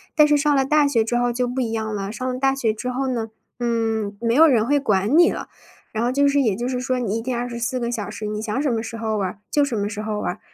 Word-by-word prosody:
但 300 -1 +6
是 295 - +4
上 290 0 +2
了 270 -1 +3
大 300 0 +3
学 230 -5 +2
之 240 +2 -2
后 245 0 +2
就 245 +1 -1
不 255 +2 -2
一 225 -2 -2
样 220 -1 -2
了， 200 0 -3
上 255 +4 -4
了 255 - -5
大 270 0 +2
学 225 -5 0
之 250 +4 -4
后 265 +2 -2
呢， 230 -3 -2 0.3
嗯， 225 -3 -1
没 230 0 0
有 320 +5 +7
人 230 -6 +3
会 285 +2 +2
管 210 0 +1
你 345 +1 +6
了。 - - -6 0.4
然 220 +1 -2
后 245 - +1
就 280 +2 +3
是， 280 0 +3
也 220 -7 +1
就 240 +3 -3
是 255 -1 -2
说 255 0 -1
你 225 -4 -1
一 - - -5
天 245 0 -3
24 240 +1 -2
个 235 0 -2
小 215 -4 -3
时， 215 - -6
你 210 0 -3
想 220 +3 -2
什 285 -3 +1
么 225 -1 0
时 230 0 -6
候 220 -1 -2
玩 190 -2 0
儿 195 - -11
就 290 - +3
什 265 -4 -1
么 205 0 -1
时 210 0 -5
候 215 -1 -3
玩 - - -1
儿， - - -17
240 Hz, 325 characters per minute, -22 LUFS, 220-265 Hz, 0.4 s, 有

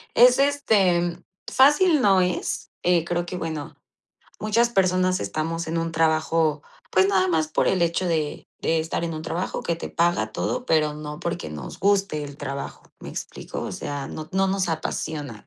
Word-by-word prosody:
es 250 +2 +7
este 195 -12 +2 0.3
fácil 295 +3 +5
no 195 -3 +5
es, 180 -1 -2
eh, 175 -2 +3
creo 175 0 -1
que, 180 - -5
bueno, 160 -4 -5 0.6
muchas 230 +3 +2
personas 185 -3 +2
estamos 160 +11 -2
en 165 +1 -2
un 165 0 -2
trabajo, 160 -1 +1 0.3
pues, 190 +1 +4
nada 190 -1 +2
más 160 -3 +1
por - - +1
el 185 -2 +2
hecho 170 +2 +1
de 155 -3 -2 0.2
de 165 - +2
estar 165 +1 -2
en 165 - -3
un 155 - -5
trabajo 170 +2 -3
que 170 - -1
te 170 - -6
paga 175 +1 +1
todo, 250 0 -2
pero 155 -2 +2
no 150 0 -7
porque - - -4
nos 75 0 -8
guste 195 -6 +2
el 140 0 -9
trabajo, 140 -1 -6 0.2
¿me - - -8
explico? - - -6
O - - -4
sea, 145 -1 -4
no 155 0 -7
no 190 +1 +2
nos 190 -2 0
apasiona. 150 -6 -4
170 Hz, 180 wpm, -24 LUFS, 155-190 Hz, 0.6 s, es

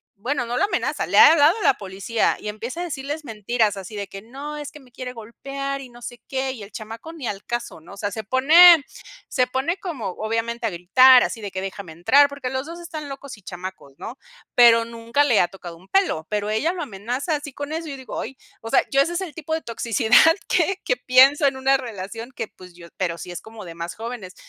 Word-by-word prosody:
bueno, 245 +4 -2
no 240 +1 -3
lo - - +2
amenaza, - - -2
le - - +1
ha - - +10
hablado 320 +5 +5
a - - -4
la 270 - +5
policía 200 +3 -1
y - - -8
empieza 225 +9 -5
a - - -2
decirles 295 -1 -5
mentiras, 220 -1 0
así 195 +3 -8
de 200 -1 -4
que: 195 +1 -9
"No, 275 +6 -8
es 295 -1 -7
que 300 - -13
me 260 -3 -20
quiere 250 +1 -7
golpear 275 +4 -6
y 255 - -10
no 240 0 -15
sé 240 -1 -8
qué", 265 0 -2
y 245 -5 -9
el 200 +1 -10
chamaco 225 +9 -8
ni 290 -8 -6
al 200 -1 -5
caso, 240 -8 -5
¿no? 175 - -14
O - - -17
sea, 205 0 -3
se 220 +2 -5
pone 310 - +7 0.4
se 250 -1 +1
pone 270 +8 -1
como, 300 - -5
obviamente, 225 +3 -2
a - - 0
gritar, 245 +9 +6
así 225 - -4
de 205 - -5
que: 190 0 -5
"Déjame 195 -3 -7
entrar", 280 - +4
porque 280 -3 -5
los 265 +3 -3
2 340 +1 -8
están 315 -4 -7
locos 275 -3 -8
y - - -18
chamacos, 180 -6 -9
¿no?, 245 +5 -8 0.3
pero 230 -1 +6
nunca 230 +4 0
le 245 -7 +3
ha 175 - +2
tocado 175 -3 -11
un 185 +3 -20
pelo, 360 - +1
pero 210 0 -2
ella 305 +12 0
lo 355 - -4
amenaza 250 - -3
así 290 0 -6
con 285 +3 -6
eso, 325 0 -4
y - - -5
yo 275 - -6
digo: 260 - -6
"Ay". 270 - -7 0.2
O 225 - -7
sea, 270 - +4
yo 275 - +4
ese 335 +5 0
es 345 - -2
el 355 -5 -6
tipo 320 0 -3
de 320 - -5
toxicidad 230 0 -2 0.3
que 375 +2 +1
que - - +2
pienso 275 - +5
en 270 - -1
una 270 +1 +3
relación 230 0 -7
que, 225 -6 -5
pues, 180 -1 -16
yo 170 -1 -13
pero 170 -3 -2
sí 180 - -8
es 175 - -7
como 220 -2 -11
de 170 - -8
más 170 +1 -6
jóvenes. 225 -4 -7
245 Hz, 245 wpm, -22 LUFS, 210-280 Hz, 0.4 s, ha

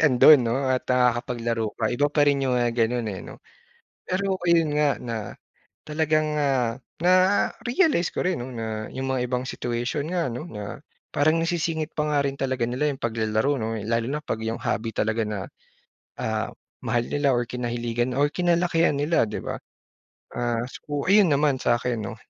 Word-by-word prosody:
andun 135 -2 +7
'no 115 - +1 0.2
at 130 - 0
nakakapaglaro 120 -3 0
ka 110 0 0
iba 145 +4 +2
pa 145 0 +2
rin 145 -1 +3
'yung, 125 - +1
ah, 120 -1 +2
ganun, 115 0 0
eh, 95 - -5
'no. - - -11 0.6
Pero 190 +1 -1
ayun 165 -4 +3
nga, 150 -1 +4
na 115 -2 -4 0.7
talagang, 155 0 +1
ah, 130 -5 +1 0.2
na-realize 185 - +2
ko - - -2
rin 185 -1 +1
'no 130 +1 -6
na 110 -2 -4
'yung 135 0 -3
mga 130 -2 0
ibang 125 0 -1
situation 120 +4 -2
nga 170 -6 0
ano 125 +5 -5
na, 105 -2 -6 0.4
parang 155 +3 +3
nasisingit 165 -2 -2
pa 150 - +1
nga 145 - +3
rin 140 0 -2
talaga 130 -3 -1
nila 145 +4 0
'yung 135 - -10
paglalaro 110 +4 0
'no 110 -2 -2 0.2
lalo 115 +1 0
na 150 +2 -2
pag 150 - -3
yung 115 +1 -3
hobby 115 +1 -2
talaga 110 +1 +1
na, 105 -1 -3 0.8
ah, - - -2 0.3
mahal 120 0 +1
nila 145 -2 +1
or 120 0 +1
kinahiligan 120 0 -2
or 145 +1 +3
kinalakihan 175 -2 +2
nila, 150 -1 +2
di 105 - -5
ba? - - -4 0.8
Ah, 120 -1 -1
so 145 +1 -5
ayun 200 -1 +6
naman 140 -2 +2
sa'kin 120 0 0
'no. 105 +2 -6
130 Hz, 170 wpm, -25 LUFS, 120-150 Hz, 0.8 s, andun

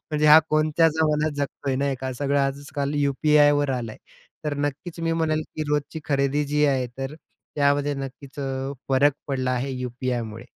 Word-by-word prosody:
म्हणजे 150 0 +1
हा 150 +1 +10
कोणत्या 155 +1 +3
जमानात 155 -1 +1
जगतोय 140 -1 -2
नाही 140 0 0
का 130 0 -3
सगळं 140 +2 0
आजकाल 140 +1 -2
यू-पी-आयवर 145 0 +3
आलंय. 120 -4 -3 0.5
तर 150 -1 -1
नक्कीच 145 +4 -4
मी 165 0 0
म्हणेल 155 -1 0
की 155 - -1
रोजची 150 +2 -1
खरेदी 140 0 +1
जी 150 +1 +1
आहे. 130 -3 +1
तर, 135 +2 -4 0.4
त्यामध्ये 145 0 +2
नक्कीच 135 +1 -8
अ, 135 0 -3 0.2
फरक 140 +2 +4 0.2
पडला 130 -2 -1
आहे 130 +2 -1
यू-पी-आयमुळे. 120 -3 -4
140 Hz, 160 wpm, -24 LUFS, 135-150 Hz, 0.5 s, हा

